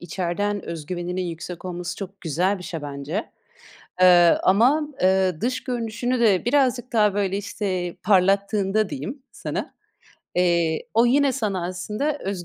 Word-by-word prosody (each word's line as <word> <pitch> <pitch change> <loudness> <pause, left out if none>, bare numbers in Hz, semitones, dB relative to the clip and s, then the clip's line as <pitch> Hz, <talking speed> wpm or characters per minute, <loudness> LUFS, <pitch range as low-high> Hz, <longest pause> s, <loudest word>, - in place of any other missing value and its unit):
içeriden 185 +4 -2
öz 160 -3 -6
güveninin 180 +1 -3
yüksek 175 +1 -6
olması 175 -1 -5
çok 195 0 -8
güzel 180 +5 0
bir - - -10
şey 165 -3 -6
bence. 145 +8 -4 0.7
Iıı, 175 -2 +7
ama, 260 +10 +3
ııı, 185 -3 +2
dış 250 +4 -2
görünüşünü 245 0 -2
de 205 -6 +3
birazcık 255 -1 +1
daha 210 -3 +3
böyle 195 -1 0
işte 190 -3 -3
parlattığında 200 +2 +2
diyeyim 225 - -6
sana, - - -5 0.6
eee, 170 -3 +1
o 230 +2 +5
yine 275 +2 +3
sana 205 -9 -2
aslında 210 +11 -3
öz 190 -5 -4
195 Hz, 140 wpm, -23 LUFS, 175-220 Hz, 0.7 s, Iıı